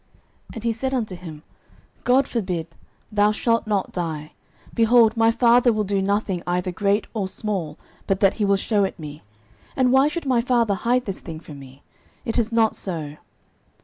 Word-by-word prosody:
09:020:002 - - -15
And 225 - -7
he 230 -1 +1
said 265 +4 -3
unto 215 -7 -2
him, 160 -4 -10 0.6
God 260 +2 +4
forbid; 180 -8 -2 0.4
thou 210 0 +3
shalt 230 +1 0
not 205 -3 -1
die: 155 -4 -4 0.4
behold, 230 -1 +4
my 225 0 +4
father 240 +1 +4
will 215 -1 0
do 200 -1 0
nothing 200 -2 -1
either 180 +1 -1
great 200 +3 +1
or 205 -4 -2
small, 185 -7 -4 0.3
but 195 -1 +1
that 195 -1 +4
he - - +3
will 200 0 +3
shew 205 +1 +1
it 190 - -2
me: 150 -2 -9 0.5
and 255 -2 +3
why 265 +2 +5
should 335 +1 -4
my 255 -3 +2
father 235 -4 +2
hide 245 +5 0
this 195 -2 -5
thing 160 -2 -8
from 150 -3 -11
me? 135 0 -14 0.4
it 225 - 0
is 230 0 -1
not 225 -1 +2
so. 155 -5 -5
205 Hz, 185 wpm, -23 LUFS, 180-235 Hz, 0.6 s, why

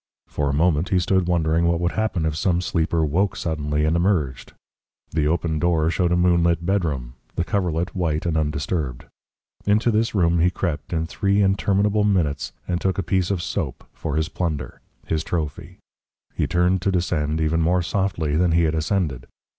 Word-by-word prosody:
For 75 -1 -2
a - - +2
moment 80 +2 +2
he 95 - +2
stood 90 0 +1
wondering 85 -1 +2
what 85 0 +1
would 85 +1 0
happen 110 -7 -1
if 80 -1 -1
some 85 +2 +1
sleeper 85 -2 0
woke 90 +5 +1
suddenly 75 -3 -1
and 80 +2 +2
emerged. 85 -8 0 0.6
The 75 -2 +1
open 80 -1 0
door 80 -1 +2
showed 90 0 +1
a - - +3
moonlit 85 -1 +2
bedroom, 75 -11 -1 0.2
the 85 - 0
coverlet 90 -1 -1
white 80 -4 -1
and 85 -2 0
undisturbed. 75 -3 -2 0.6
Into 110 +3 +3
this 110 +1 0
room 85 -3 +3
he 90 +2 +4
crept 85 -4 -3
in 80 -1 0
three 100 +4 +1
interminable 100 +2 +2
minutes 85 -9 0 0.2
and 90 -1 -1
took 95 0 0
a 95 - 0
piece 90 +1 0
of 95 -4 -1
soap - - -3
for 75 -3 -4
his 80 0 +1
plunder 80 -7 -4 0.2
his 80 -1 -1
trophy. 80 -4 -4 0.6
He - - -1
turned 90 +1 +2
to 95 - +1
descend 80 -4 0
even 80 +1 +1
more 90 +2 +2
softly 85 -4 -1
than 85 +1 +2
he 85 0 +4
had 80 -1 +1
ascended. 80 -6 -1
85 Hz, 180 wpm, -23 LUFS, 80-90 Hz, 0.6 s, he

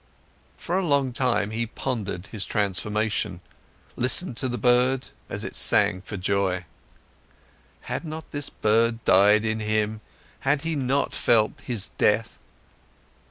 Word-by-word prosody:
For 180 +3 -1
a - - -1
long 140 -6 +1
time, 120 -5 0
he 115 +1 -2
pondered 105 -7 -4
his 105 -1 -4
transformation, 105 +2 -1 0.6
listened 130 +3 +1
to 130 - +1
the 120 - -3
bird, 125 +2 +2 0.2
as - - -3
it - - -6
sang 100 -3 +3
for 100 +2 -7
joy. 95 -1 0 1.2
Had - - -4
not 160 0 -7
this 145 -1 -2
bird 115 +2 +1
died 105 +3 +5
in 110 0 -1
him, 110 0 -1 0.4
had 140 +1 0
he 165 -1 -1
not 140 0 0
felt 120 +5 +1
its 110 -5 +3
death? 110 +2 0
115 Hz, 135 wpm, -25 LUFS, 105-130 Hz, 1.2 s, died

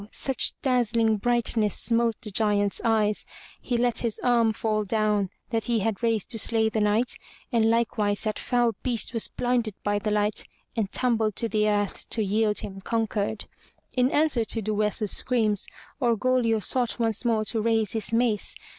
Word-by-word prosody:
such 265 0 0
dazzling 235 -4 +2
brightness 225 -2 +1
smote 230 -1 +2
the 210 - -5
Giant's 205 -1 +1
eyes, 215 -2 +1 0.3
he 245 - -1
let 240 -1 +1
his 230 -3 -2
arm 235 -2 +3
fall 215 0 -1
down 210 -1 0 0.2
that 225 -2 -1
he 235 -3 +1
had 220 +1 -2
raised 225 -4 0
to 225 - 0
slay 220 +1 +2
the 220 - -2
Knight, 210 +4 +1 0.3
and 225 -2 +3
likewise 215 -3 +1
that 215 -2 -2
foul 240 -2 +1
beast 235 -3 0
was 230 - 0
blinded 245 -4 -1
by 205 0 0
the 210 - -2
light 210 0 0 0.3
and 215 -4 -1
tumbled 225 -5 0
to 230 - 0
the 215 -1 +1
earth 205 -1 -2
to 220 - +1
yield 210 +1 +1
him 195 -1 -7
conquered. 220 -1 -2 0.5
In 250 0 +3
answer 295 -6 +2
to 225 - 0
Duessa's 210 0 0
screams, 220 -5 0 0.3
Orgoglio 235 -1 +2
sought 245 +4 0
once 225 -3 0
more 225 -3 +1
to 220 0 -1
raise 220 -2 +1
his 220 -1 -3
mace. 230 -3 +1
225 Hz, 170 wpm, -26 LUFS, 210-235 Hz, 0.5 s, arm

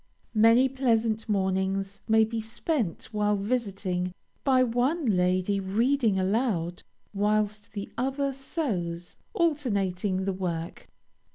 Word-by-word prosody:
Many 230 +4 +6
pleasant 230 -4 0
mornings 195 0 0
may 220 0 +5
be 225 +1 -2
spent 225 - -2
while 210 -1 +1
visiting, 195 -5 -2 0.3
by 260 -2 +4
one 255 +7 0
lady 185 -1 +2
reading 225 +3 +1
aloud 190 -3 0 0.3
whilst 210 +1 0
the 200 -2 -4
other 270 +2 0
sews, 185 - -3 0.2
alternating 200 - 0
the 195 - 0
work. 170 -3 -4
210 Hz, 105 wpm, -27 LUFS, 190-245 Hz, 0.3 s, Many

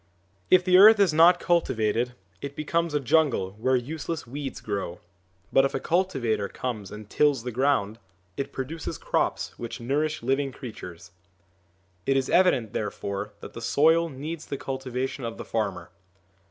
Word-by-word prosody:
If 185 -1 +5
the 185 0 +6
earth 215 +2 +9
is 190 -6 +4
not 170 +3 +6
cultivated 120 -8 +1 0.3
it 140 0 -6
becomes 165 +1 -1
a - - +3
jungle 135 -8 +2
where 130 +3 +2
useless 155 +5 -3
weeds 135 +2 -6
grow; 100 -4 -4 0.5
but 135 - +6
if 135 - 0
a - - 0
cultivator 130 - 0
comes 110 -6 -5
and 105 0 -9
tills 145 -1 +2
the 125 - -4
ground, 120 -4 +1 0.4
it 140 0 -4
produces 145 +5 -5
crops - - -1
which 120 - -6
nourish 150 +4 -1
living 135 +2 0
creatures. 90 -10 -9 1.0
It 135 0 +3
is 135 - -1
evident, 130 - +3
therefore, 105 -1 -4
that - - -9
the 115 - -8
soil 160 +7 +3
needs 155 +3 -6
the 140 - -4
cultivation 130 0 -4
of 115 -1 -5
the - - -7
farmer. 105 -4 -3
135 Hz, 155 wpm, -26 LUFS, 115-155 Hz, 1.0 s, earth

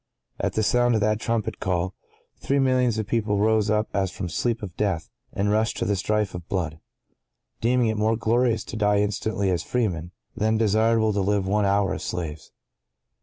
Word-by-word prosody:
At - - -1
the 110 - +1
sound 120 +2 +3
of 110 - +1
that 105 +1 +1
trumpet 115 -2 -2
call, 90 -1 -1 0.5
three 140 - 0
millions 130 -4 +2
of 110 - -1
people 105 -1 0
rose 110 0 +2
up 105 0 +1
as 95 -1 +1
from 95 +1 -5
the 85 - -5
sleep 115 -2 -1
of 90 -4 -7
death, 95 -6 -1 0.2
and 105 +1 0
rushed 110 +1 +1
to - - -1
the 100 - +1
strife 105 +1 0
of 90 -2 -8
blood; 80 -5 -2 0.8
deeming 125 +1 +2
it 110 -1 0
more 110 +1 +2
glorious 115 +1 +1
to - - -8
die 105 -1 +2
instantly 100 -1 0
as 85 -2 0
freemen, 90 -8 -1 0.3
than 110 +1 +1
desirable 110 0 +3
to 100 - 0
live 100 0 +1
one 105 +1 +2
hour 100 0 +2
as - - -5
slaves. 80 -3 -5
105 Hz, 195 wpm, -24 LUFS, 100-110 Hz, 0.8 s, sound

